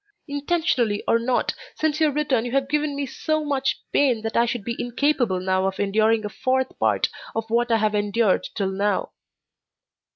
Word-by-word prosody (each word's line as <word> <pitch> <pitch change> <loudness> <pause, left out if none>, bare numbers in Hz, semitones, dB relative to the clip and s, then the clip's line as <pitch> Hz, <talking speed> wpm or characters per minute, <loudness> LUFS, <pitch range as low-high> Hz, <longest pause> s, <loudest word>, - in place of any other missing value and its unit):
Intentionally 285 -7 0
or 230 - +4
not, 245 +2 0 0.2
since 310 0 0
your 310 -1 +4
return 275 -5 +1
you 245 0 -5
have 270 0 +1
given 300 0 0
me 280 0 -2
so 310 +4 -2
much 270 -2 0
pain 250 -6 +2
that 225 - -3
I 235 +1 +4
should 235 -2 -3
be 235 +3 -3
incapable 245 -5 +1
now 185 +1 +1
of 190 - -4
enduring 215 +2 +2
a - - 0
fourth 260 +3 -1
part - - +2 0.3
of 225 0 -2
what 240 +1 +2
I 230 - +4
have 215 -1 +1
endured 210 0 +1
till 195 -2 -1
now. 195 0 -1
240 Hz, 185 wpm, -23 LUFS, 210-280 Hz, 0.3 s, or